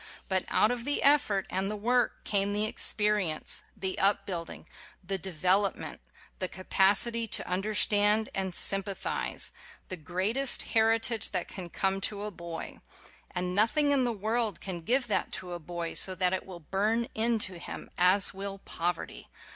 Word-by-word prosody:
But 190 -2 0
out 215 - +3
of 245 -1 -3
the 290 +3 -1
effort 275 -10 +3
and 190 +1 -1
the 210 - -3
work 240 +4 0
came 200 0 +1
the 210 +1 +1
experience; 210 -6 +1
the 190 -1 -3
upbuilding; 190 -3 -1 0.4
the 190 +1 -2
development; 190 +3 0 0.4
the 185 - 0
capacity 200 +5 +1
to - - +1
un 180 +1 -1
derstand 210 +1 +3
and 190 -2 -2
sympathize; 195 0 0 0.4
the 185 - -4
greatest 190 - +1
heritage 225 0 +2
that 180 -2 -2
can 180 -3 -8
come 195 +2 -1
to 205 +1 -2
a 210 - -4
boy. 170 -3 -8 0.5
And 180 0 -3
nothing 285 +9 +3
in 275 -2 +3
the 245 - +1
world 220 +1 -1
can 180 -3 -6
give 250 +9 +1
that 215 - -1
to 180 -1 -6
a 175 - -5
boy, 170 +1 -5
so 185 - +3
that 180 0 +1
it 190 - -3
will 180 -3 -9
burn 210 +8 0
into 220 -5 +1
him, - - -8
as 180 +2 +5
will 195 0 -6
poverty. 175 -2 -4
195 Hz, 160 wpm, -29 LUFS, 185-220 Hz, 0.5 s, as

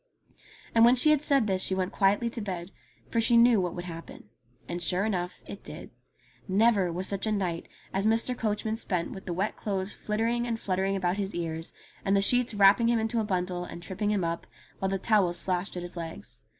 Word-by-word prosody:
And 230 - +5
when 240 +2 +7
she 305 +5 +4
had 300 -2 +3
said 280 -5 +2
this 190 -2 +1
she 190 - 0
went 185 0 -1
quietly 205 +4 +2
to 235 - -5
bed, 180 -2 -5 0.4
for 230 - +2
she 235 +1 +4
knew 235 -3 +6
what 180 -2 -3
would 175 0 -5
happen. 165 -10 -9 0.4
And 175 0 -4
sure 185 +3 +1
enough 180 -4 -3
it - - -9
did. - - -9 0.6
Never 200 -2 +3
was 180 +3 -3
such 200 +2 0
a - - +1
night 180 -5 -2 0.3
as 195 +2 +1
Mr. 230 +3 +2
Coachman 220 -1 -2
spent 180 -6 -2
with 190 - -9
the 175 - -2
wet 195 +5 -1
clothes 195 -1 -1
flittering 230 +3 -1
and 230 -1 -2
fluttering 190 0 -1
about 185 0 0
his 200 0 -3
ears, 165 -1 -4 0.3
and 195 +1 +2
the - - +3
sheets 245 +1 +4
wrapping 205 +4 +5
him 235 - +3
into 225 +1 0
a - - +1
bundle, 180 -3 -2
and 175 -1 -8
tripping 200 +3 -2
him 205 -3 +1
up, 170 0 -3 0.3
while 190 - 0
the 195 - 0
towels 190 -4 +2
slashed 185 0 -1
at 175 - -4
his 175 +1 -8
legs. 165 -1 -6
195 Hz, 215 wpm, -28 LUFS, 180-225 Hz, 0.6 s, when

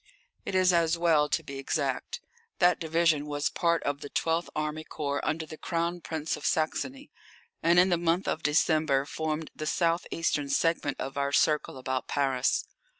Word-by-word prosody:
It - - -2
is 185 -1 +4
as 170 -1 +2
well 160 -3 +3
to - - 0
be 140 0 -7
exact. 135 -1 -2 0.4
That 180 0 +4
division 160 -2 +1
was 145 0 -1
part 170 -2 +1
of 145 0 -2
the 145 - -7
12th 165 +3 0
Army 155 0 -2
Corps 145 -2 -3
under 160 +1 -1
the 155 0 -10
Crown 170 0 -2
Prince 160 -1 -3
of - - -11
Saxony, 265 - -1 0.5
and 170 +1 +4
in 180 +2 +6
the 175 -2 +2
month 175 +3 +1
of 160 - -1
December 150 -2 +2
formed 155 +1 -3
the 155 - -5
south 170 +1 +1
eastern 145 -4 -1
segment 145 0 0
of 135 +1 -4
our 140 0 0
circle 150 -2 +2
about 130 0 -3
Paris. 135 -2 +1
155 Hz, 175 wpm, -28 LUFS, 145-170 Hz, 0.5 s, in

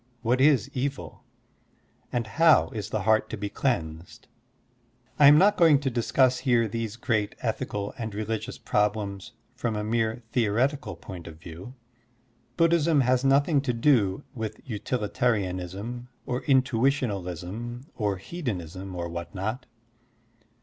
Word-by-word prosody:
What 125 +3 +2
is 135 -4 +4
evil? 135 +1 -4 0.9
And 120 -2 -1
how 160 +9 +4
is 105 -2 -5
the 110 -2 -2
heart 110 +1 +3
to 110 - -5
be 100 0 -4
cleansed? 85 - -3 0.9
I 145 - +8
am 145 +1 +9
not 200 +5 +5
going 160 -5 +6
to 135 -2 -2
discuss 125 +2 +2
here 120 -4 +2
these 115 0 -4
great 110 -3 -1
ethical 105 -3 -3
and 110 -3 -4
religious 110 +1 -3
problems 105 -2 -1 0.2
from 115 -2 -2
a 105 - -2
mere 115 +2 -1
theoretical 120 - 0
point 85 0 -10
of 80 -2 -10
view. 90 +9 -10 0.8
Buddhism 165 -3 +4
has 130 0 +2
nothing 140 +2 +3
to 130 -3 -1
do 115 -3 +2
with 110 -4 -5
utilitarianism 105 -1 -2 0.2
or 125 +1 -2
intuitionalism 120 - 0
or 105 -3 -1
hedonism 95 - -5
or 85 -1 -3
what 85 +3 -7
not. 110 +7 -3
115 Hz, 130 wpm, -26 LUFS, 100-130 Hz, 0.9 s, am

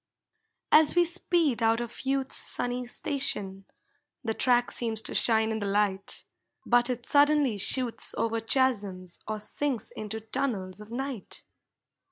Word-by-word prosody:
As 310 +1 +6
we 350 0 +5
speed 335 -7 0
out 225 0 +3
of 240 +2 -6
youth's 270 0 +1
sunny 245 0 -1
station, 205 -8 -2 0.6
The 225 -2 -1
track 245 +1 +2
seems 225 -2 -2
to - - -4
shine 220 -1 +2
in 220 - -2
the 205 - -3
light, 200 -1 -1 0.4
But 240 +1 +3
it 245 -1 -3
suddenly 285 -6 +3
shoots 245 +3 +2
over 230 0 0
chasms 210 -7 0
Or 215 0 -2
sinks 250 +2 -2
into 215 +1 -5
tunnels 220 -5 -3
of 210 - -12
night. 255 -3 -5
235 Hz, 140 wpm, -28 LUFS, 210-265 Hz, 0.6 s, As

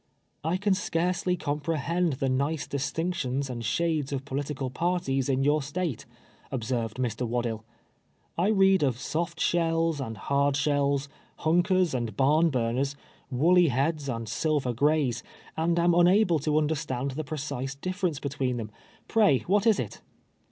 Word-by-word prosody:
" - - -46
I 165 +4 0
can 200 0 +2
scarcely 180 0 0
comprehend 160 +3 -1
the 135 +1 -2
nice 140 +4 0
distinc 160 +5 -2
tions 135 -4 -2
and 120 -2 -5
shades 155 +4 0
of 135 -1 -3
political 140 -1 -3
parties 140 -4 0
in 135 0 +1
your 150 +2 +3
State," 145 -2 -3 0.4
observed 120 -3 -2
Mr. 125 -1 -2
Waddill. 120 -2 -2 0.4
" - - -42 0.3
I 175 +4 +1
read 195 -3 +4
of 130 -5 +1
soft 170 +5 -3
shells 165 -3 +1
and 115 -4 -5
hard 140 +6 +1
shells, 140 -1 +1 0.3
hunkers 175 +1 +2
and 115 -5 -3
barnburners, 135 -2 +2 0.3
woolly 170 +7 +4
heads 140 +2 0
and 115 -2 -3
silver 145 -2 0
grays, 140 -2 +1 0.3
and 165 +2 +1
am 170 0 +4
unable 175 0 +4
to 150 +1 0
understand 145 -4 -1
the 155 +4 -4
precise 135 -3 -4
difference 185 0 -2
between 135 -3 -2
them. 110 -2 -5 0.4
Pray, 200 - +4
what 205 +4 +2
is 220 -3 +4
it 115 - -5
145 Hz, 150 wpm, -27 LUFS, 130-170 Hz, 0.4 s, read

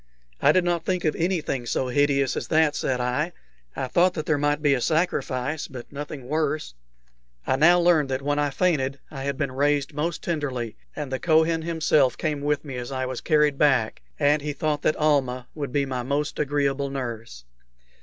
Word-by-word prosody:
"I - - +6
did 185 - +3
not 175 -2 0
think 180 -1 -1
of 155 - +1
anything 160 -8 -1
so 130 +2 -1
hideous 140 0 +2
as - - -4
that," 155 -2 +3
said 130 -3 -1
I. 125 +8 -1 0.4
"I - - -2
thought 180 +7 +3
that 155 -2 -3
there 155 -3 +1
might 145 +1 0
be 145 -2 +4
a 130 - 0
sacrifice, 155 -3 -1
but 125 -4 -10
nothing 145 -2 -7
worse." 150 - -1 0.7
I - - +2
now 170 +6 +5
learned 170 -5 +3
that 135 +1 -2
when 145 +1 0
I 145 0 +1
fainted 140 -3 0
I 135 -2 -6
had 140 -1 -2
been 140 -4 -1
raised 145 +2 +1
most 155 +4 -2
tenderly, 135 -9 -3 0.2
and 145 -3 -5
the 130 - -2
Kohen 160 0 +3
himself 155 -5 +2
came 150 -3 -2
with 145 +1 -1
me 135 -3 -6
as 125 +1 -5
I 130 -1 -2
was 130 -1 -4
carried 150 -3 +2
back, 130 -7 +2 0.2
and 145 0 +3
he 150 0 -3
thought 150 0 -1
that 155 - +2
Almah 135 -5 +1
would 145 -4 -5
be 140 +1 +1
my 130 -2 -3
most 140 +4 -2
agreeable 140 -1 0
nurse. 115 - -6
145 Hz, 195 wpm, -25 LUFS, 130-155 Hz, 0.7 s, I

